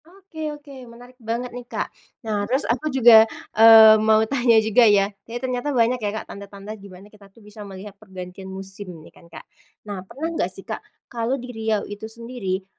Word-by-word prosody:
Oke 340 Hz, -3 st, -8 dB
oke 295 Hz, -1 st, -11 dB, 0.2 s
menarik 245 Hz, +2 st, -15 dB
banget 235 Hz, +2 st, -4 dB
nih 245 Hz, -, -7 dB
Kak, -, -, -4 dB, 0.3 s
nah 210 Hz, -2 st, -1 dB
terus 265 Hz, +3 st, 0 dB
aku 255 Hz, +6 st, -1 dB
juga, 235 Hz, -5 st, +6 dB, 0.2 s
eee, 220 Hz, -1 st, +8 dB
mau 220 Hz, 0 st, +4 dB
tanya 240 Hz, -2 st, +2 dB
juga 220 Hz, +2 st, +3 dB
ya, 200 Hz, 0 st, +2 dB, 0.2 s
iya 235 Hz, -, -4 dB
ternyata 255 Hz, +2 st, -3 dB
banyak 245 Hz, -2 st, +1 dB
ya 210 Hz, -, -1 dB
Kak -, -, -7 dB
tanda-tanda 200 Hz, +1 st, -10 dB
gimana 195 Hz, -2 st, -13 dB
kita 200 Hz, -2 st, -18 dB
tuh 195 Hz, -, -33 dB
bisa 210 Hz, +1 st, -12 dB
melihat 200 Hz, 0 st, -10 dB
pergantian 190 Hz, -1 st, -10 dB
musim 195 Hz, +1 st, -8 dB, 0.2 s
nih -, -, -17 dB
kan 170 Hz, -, -20 dB
Kak. 165 Hz, -, -12 dB, 0.4 s
Nah 205 Hz, -3 st, -6 dB
pernah 275 Hz, -, -6 dB
enggak -, -, -1 dB
sih -, -, -9 dB
Kak -, -, -6 dB, 0.2 s
kalau 240 Hz, +2 st, -3 dB
di 250 Hz, -1 st, -9 dB
Riau 220 Hz, -2 st, -2 dB
itu 205 Hz, +2 st, -8 dB
sendiri, 225 Hz, -5 st, -5 dB
220 Hz, 190 wpm, -22 LUFS, 200-245 Hz, 0.4 s, eee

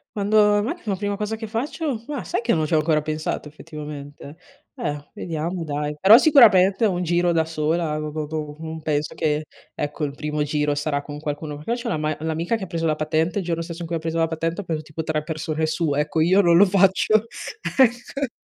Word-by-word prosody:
Quando 205 Hz, +1 st, +1 dB
ho 205 Hz, 0 st, +5 dB
ma 275 Hz, +9 st, -2 dB
la 200 Hz, -2 st, 0 dB
prima 205 Hz, +1 st, -2 dB
cosa 210 Hz, +1 st, -2 dB
che 220 Hz, 0 st, -6 dB
faccio? 245 Hz, +2 st, -3 dB
Ma 290 Hz, -4 st, -4 dB
sai -, -, -2 dB
che -, -, +1 dB
non 155 Hz, -1 st, +1 dB
ci 155 Hz, -, -3 dB
ho -, -, +5 dB
ancora 155 Hz, 0 st, +2 dB
pensato 155 Hz, 0 st, -3 dB
effettivamente, 150 Hz, -1 st, -9 dB, 0.4 s
eh 145 Hz, -, -4 dB
vediamo 165 Hz, +1 st, -3 dB
dai, 150 Hz, 0 st, -3 dB
però 205 Hz, +8 st, +9 dB
sicuramente 225 Hz, -, +6 dB
un 180 Hz, -3 st, 0 dB
giro 175 Hz, +1 st, +2 dB
da 160 Hz, -1 st, +2 dB
sola, 160 Hz, 0 st, -1 dB
do 155 Hz, 0 st, -4 dB
don 150 Hz, -1 st, -5 dB
non 160 Hz, 0 st, -6 dB
penso 150 Hz, -1 st, -1 dB
che 150 Hz, -1 st, -1 dB, 0.3 s
ecco, 150 Hz, +1 st, -3 dB
il 140 Hz, -1 st, -5 dB
primo 150 Hz, 0 st, -3 dB
giro 150 Hz, 0 st, 0 dB
sarà 145 Hz, 0 st, -1 dB
con 145 Hz, 0 st, -8 dB
qualcuno. 150 Hz, 0 st, -5 dB
Perché 235 Hz, +10 st, -3 dB
c'ho -, -, -2 dB
l'ama 155 Hz, -1 st, -1 dB
l'amica 160 Hz, +6 st, -1 dB
che 220 Hz, -, -5 dB
ha -, -, -5 dB
preso 165 Hz, -2 st, -2 dB
la 155 Hz, -, +1 dB
patente, 160 Hz, +4 st, 0 dB
il 190 Hz, -, -4 dB
giorno 170 Hz, -1 st, -1 dB
stesso 170 Hz, +1 st, -7 dB
in 170 Hz, -, -4 dB
cui 165 Hz, 0 st, -2 dB
ha -, -, -5 dB
preso 165 Hz, +1 st, -3 dB
la 165 Hz, -, +2 dB
patente 165 Hz, +3 st, -2 dB
ha -, -, -10 dB
preso 160 Hz, -3 st, -3 dB
tipo 155 Hz, +1 st, -6 dB
3 155 Hz, -1 st, -1 dB
persone 155 Hz, 0 st, -2 dB
su. 160 Hz, -2 st, 0 dB
Ecco, 150 Hz, +2 st, 0 dB
io 185 Hz, +5 st, +5 dB
non 170 Hz, -2 st, +5 dB
lo 200 Hz, -, +8 dB
faccio, 195 Hz, +3 st, +3 dB, 0.5 s
ecco. 260 Hz, +1 st, +2 dB
160 Hz, 220 wpm, -23 LUFS, 150-195 Hz, 0.5 s, però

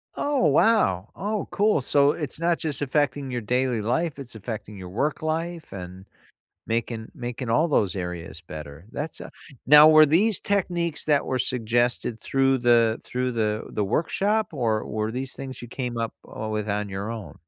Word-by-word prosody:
Oh, 285 Hz, -9 st, +1 dB
wow. 135 Hz, -, +3 dB
Oh, 205 Hz, +3 st, -2 dB
cool. 205 Hz, -7 st, +2 dB
So 140 Hz, +2 st, +4 dB
it's 150 Hz, -2 st, -5 dB
not 170 Hz, 0 st, +2 dB
just 150 Hz, -3 st, -2 dB
affecting 145 Hz, -1 st, 0 dB
your 125 Hz, -, -1 dB
daily 125 Hz, +1 st, 0 dB
life, 145 Hz, +6 st, -1 dB
it's 125 Hz, -4 st, -9 dB
affecting 105 Hz, 0 st, -6 dB
your 90 Hz, -1 st, -8 dB
work 135 Hz, +11 st, -1 dB
life 165 Hz, +1 st, -3 dB
and 95 Hz, 0 st, -8 dB, 0.6 s
making 115 Hz, 0 st, -2 dB
making 120 Hz, 0 st, -5 dB
all 155 Hz, +9 st, +3 dB
those 100 Hz, -, +1 dB
areas 90 Hz, -2 st, -5 dB
better. 80 Hz, 0 st, -10 dB
That's 150 Hz, +2 st, -5 dB
a -, -, -9 dB, 0.3 s
now 150 Hz, +2 st, +9 dB
were 155 Hz, -1 st, +8 dB
these 190 Hz, +7 st, +3 dB
techniques 175 Hz, -5 st, -1 dB
that 145 Hz, -2 st, +2 dB
were 130 Hz, -, -1 dB
suggested 120 Hz, -1 st, 0 dB
through 135 Hz, +2 st, +2 dB
the 120 Hz, -2 st, +3 dB
through 125 Hz, 0 st, -2 dB
the 110 Hz, -2 st, -1 dB
the 105 Hz, -, -1 dB
workshop, 195 Hz, -, 0 dB
or 110 Hz, -5 st, 0 dB
were 110 Hz, +1 st, -2 dB
these 130 Hz, +2 st, -5 dB
things 130 Hz, -2 st, -7 dB
you 120 Hz, -, -8 dB
came 125 Hz, -2 st, -4 dB
up, 115 Hz, -1 st, -2 dB
uh, 110 Hz, 0 st, -6 dB
with 105 Hz, 0 st, -2 dB
on 105 Hz, 0 st, -1 dB
your 100 Hz, +3 st, -4 dB
own? 100 Hz, -11 st, -7 dB
125 Hz, 175 wpm, -25 LUFS, 110-155 Hz, 0.6 s, now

